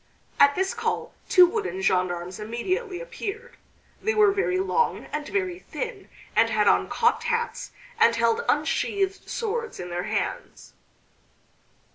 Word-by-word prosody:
At 285 0 +6
this 380 +3 0
call 455 -1 -2 0.2
two 365 -1 +8
wooden 370 - -2
gendarmes 180 -1 0
immediately 360 - -3
appeared. 480 -1 -6 0.5
They 440 0 0
were 420 -2 +6
very 390 -2 0
long 465 +5 0
and 300 -1 -3
very 375 -3 -2
thin 455 -1 -6 0.3
and - - +4
had - - +2
on - - +3
cocked - - +1
hats, 470 0 -2 0.3
and 455 - +5
held 460 +1 +2
unsheathed 390 -1 0
swords 465 0 -3
in 180 0 -6
their 175 +1 -3
hands. - - -4
390 Hz, 135 wpm, -25 LUFS, 285-455 Hz, 0.5 s, two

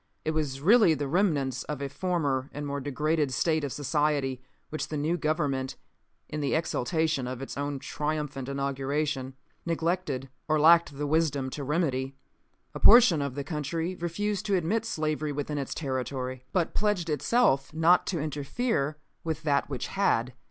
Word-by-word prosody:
It 155 - +1
was 145 -4 -2
really 200 -1 +6
the 145 0 -3
remains 140 - +1
of 150 -2 -4
a 140 - -2
former 140 -3 -1
and 145 +1 -5
more 140 0 -3
degraded 150 +1 0
state 160 +3 +1
of 140 - -2
society 145 -2 0 0.3
which 155 - -3
the 155 - -4
new 155 +4 0
government, 145 -5 -1 0.5
in 150 - -4
the 140 - +1
exultation 160 -3 0
of 125 -1 -5
its 135 - -6
own 145 0 -2
triumphant 145 -1 -3
inauguration, 140 0 -2 0.3
neglected 165 -5 -1 0.2
or 155 0 +2
lacked 165 -2 +5
the 145 - -2
wisdom 145 -3 +1
to 145 - -5
remedy. 135 -3 -1 0.6
A - - -6
portion 225 -9 +7
of 140 -2 -3
the 140 - -3
country 160 +4 -3
refused 185 +3 -2
to 200 - +2
admit 195 +6 0
slavery 155 -5 -1
within 145 +1 -3
its 135 - -4
territory, 130 -2 -3
but 175 -3 0
pledged 205 -5 0
itself 150 - +2
not 165 +3 +4
to 175 - -1
interfere 150 - -1 0.3
with 160 -1 -3
that 140 -2 +1
which 135 -3 -3
had. 125 -11 +1
150 Hz, 160 wpm, -28 LUFS, 135-165 Hz, 0.6 s, portion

